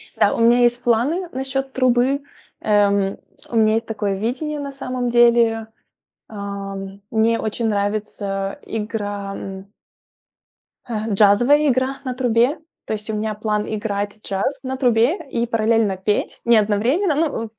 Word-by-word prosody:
Да, - - +3
у - - -4
меня 235 +2 +5
есть 240 0 +2
планы 275 +10 +1
насчёт 270 +1 -3
трубы, 260 +2 +2 0.4
эм. 200 -2 +2 0.3
У 235 - -5
меня 220 -1 +4
есть 225 - -1
такое 205 -3 -2
видение 285 +8 -3
на 280 -1 -5
самом 255 -2 -3
деле. 235 -2 +4 0.6
Ам, 200 -1 -6
мне 225 +1 +2
очень 225 +1 -2
нравится 200 -1 -2
игра 205 -2 -4
м 195 0 -7 1.2
э, 220 -1 -2
джазовая 240 +9 +5
игра 260 +1 0
на 255 - -2
трубе, 245 +3 +2 0.3
то - - -3
есть 210 +1 -6
у - - -1
меня 215 0 -2
план 210 -1 -1
играть 205 -1 -3
джаз 200 +8 -2
на 260 0 -3
трубе 245 +3 +3
и 235 -1 -1
параллельно 225 -3 +1
петь. 205 +2 -1
Не 235 -1 +5
одновременно, 235 - +2
ну, 290 -7 0
225 Hz, 145 wpm, -21 LUFS, 205-250 Hz, 1.2 s, меня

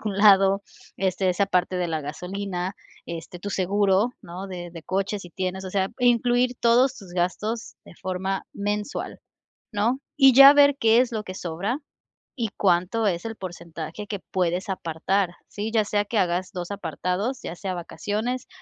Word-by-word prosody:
algún 210 -3 -3
lado. 195 -1 +6 0.3
Este, 190 0 0
esa 200 +3 +2
parte 180 -1 +1
de 180 -1 0
la 160 -1 -1
gasolina, 180 +5 -4 0.3
este, 170 +1 -7
tu 205 - -5
seguro, 195 +3 +2
¿no?, 180 +3 -7
de 175 -2 -6
de 165 -2 -9
coche, 195 +3 -1
si 180 - -10
tienes. 190 +1 -3
O 185 - -6
sea, 190 -1 +1
incluir 245 0 +3
todos 250 +3 +4
tus 190 -5 -12
gastos 210 +6 -2
de - - -13
forma 190 +2 -3
mensual, 205 +4 -3 0.5
¿no? 225 +6 +1 0.2
Y 270 -3 +7
ya 275 +1 +11
ver 285 -1 +6
qué 225 +1 +5
es 250 -1 +1
lo 215 -1 -3
que 185 - -7
sobra, 185 - -3 0.6
y 225 - 0
cuánto 190 +4 +2
es 175 0 -1
el 225 -1 -4
porcentaje 170 +1 -7
que 205 -3 -4
puedes 180 +2 0
apartar, 185 +1 0 0.2
¿sí? 210 +2 -4
Ya 220 -2 +4
sea 205 0 0
que 220 +1 -2
hagas 180 0 0
2 180 +1 -5
apartados, 190 - -2
ya - - -4
sea 190 -2 -3
vacaciones 215 +8 -3
195 Hz, 170 wpm, -25 LUFS, 180-220 Hz, 0.6 s, ya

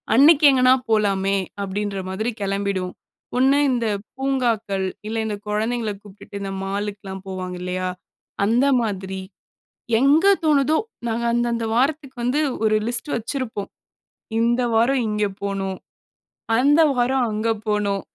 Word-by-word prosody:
அன்னைக்கு 295 +4 +7
எங்கனா 255 -1 +5 0.2
போலாமே, 200 -2 +2 0.2
அப்படின்ற 200 +1 -3
மாதிரி 215 +5 -2
கெளம்பிடுவோம். 195 -2 -2 0.4
ஒண்ணு 270 +2 +4
இந்த 235 -2 0 0.3
பூங்காக்கள், 230 -8 0 0.2
இல்ல 225 +1 -3
இந்த 215 -1 -2
கொழந்தைகள 220 +1 -1
கூப்பிட்டுட்டு, 200 0 -10
இந்த 195 - -4
மாலுக்குலா 200 0 -4
போவாங்க 185 -1 -5
இல்லையா? 185 0 -2 0.6
அந்த 235 +6 +3 0.2
மாதிரி, 190 -3 -3 0.8
எங்க 295 +8 +4 0.2
தோணுதோ, 300 0 +3 0.3
நாங்க 230 +1 -1
அந்த, 240 0 +1
அந்த 230 -1 -2
வாரத்துக்கு 275 +1 0
வந்து, 260 +5 +1 0.2
ஒரு 215 0 +3
லிஸ்ட் 240 +4 -1
வச்சுருப்போம். 230 -3 -4 0.7
இந்த 240 +2 +2
வாரம் 245 +3 +3
இங்க 210 0 0 0.2
போணும். 195 -1 -2 0.8
அந்த 290 +6 +5
வாரம் 250 +1 +2
அங்க 215 +2 -1 0.2
போணும். 205 -2 0
220 Hz, 120 wpm, -22 LUFS, 200-255 Hz, 0.8 s, அன்னைக்கு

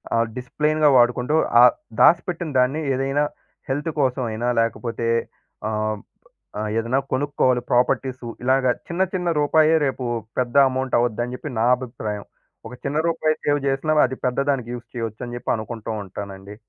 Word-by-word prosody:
ఆహ్, 115 0 +2
డిసిప్లేన్‌గా 150 +4 +1
వాడుకుంటూ 125 +4 +3 0.3
ఆహ్, 125 - +8 0.3
దాసిపెట్టిన 170 +2 +3
దాన్ని 135 +5 +2
ఏదైనా 135 +3 0 0.5
హెల్త్ 145 +4 -1
కోసం 130 -1 +1
అయినా 115 +3 -2
లేకపోతే 115 0 -1 0.6
ఆహ్, 110 0 -1 0.6
ఆహ్, 105 0 -2
ఏదైనా 120 +4 +1
కొనుక్కోవాలి 130 -2 +1
ప్రాపర్టీసు. 125 0 +1 0.2
ఇలాగ 130 +1 +3 0.2
చిన్న, 175 +2 0
చిన్న 180 -1 -1
రూపాయే 155 +2 +4
రేపు 130 -1 -3 0.4
పెద్ద 125 +1 -2
అమౌంట్ 130 -1 -1
అవుద్దని 120 +1 -1
చెప్పి 150 - -7
నా 115 - +3
అభిప్రాయం. 110 -5 -6 0.4
ఒక 125 - -9
చిన్న 145 +2 -1
రూపాయి 155 -2 +1
సేవ్ 145 -1 +2
చేసినా 140 +3 0
అది 130 +1 -7
పెద్ద 125 - -1
దానికి 125 -4 -2
యూజ్ 120 -1 -8
చేయొచ్చు 115 -1 -4
అని 120 - -7
చెప్పి - - -2
అనుకుంటూ 110 0 -6
ఉంటానండి. 100 +1 -8
125 Hz, 145 wpm, -22 LUFS, 115-145 Hz, 0.6 s, ఆహ్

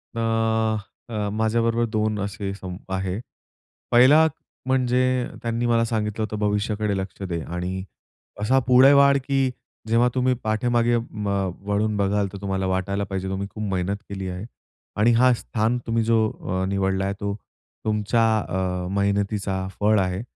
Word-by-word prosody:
अ, - - -2 0.9
अ, 105 -3 -2
माझ्याबरोबर 115 +2 +1
दोन 110 -1 0
असे 100 0 -3
संप 95 -1 -9
आहे. 95 +1 -2 0.7
पहिला 140 +7 +7 0.4
म्हणजे 130 -1 +2 0.4
त्यांनी 115 +1 -1
मला 115 -1 +3
सांगितलं 110 -1 -2
होतं 105 0 -4
भविष्याकडे 105 0 0
लक्ष 95 +1 -6
दे. 85 -1 -2
आणि 90 +2 -4 0.6
असा 130 +6 +3
पुढे 130 +2 +7
वाढ, 140 0 +6
की 135 -2 +2 0.4
जेव्हा 115 +2 +4
तुम्ही 130 0 +2
पाठीमागे 120 +2 +2
म, 105 -3 -5 0.4
वळून 105 +1 +1
बघाल 100 0 +1
तर - - -6
तुम्हाला 95 -1 -1
वाटायला 95 +2 -1
पाहिजे 95 -1 -4
तुम्ही 95 +1 -3
खूप 110 - -6
मेहनत 95 +2 0
केली 95 -1 -5
आहे. 90 +3 -5 0.5
आणि 110 +3 +4
हा 125 +2 +5
स्थान 115 0 -1
तुम्ही 115 0 +1
जो 110 -1 +3 0.2
अ, 95 0 0
निवडला 95 -1 0
आहे 100 - -1
तो 100 0 -2 0.5
तुमच्या 110 +2 +1 0.3
अ, 90 -1 -2
मेहनतीचा 100 -1 0
फळ 105 0 +4
आहे. 95 0 -1
105 Hz, 145 wpm, -24 LUFS, 95-115 Hz, 0.9 s, पहिला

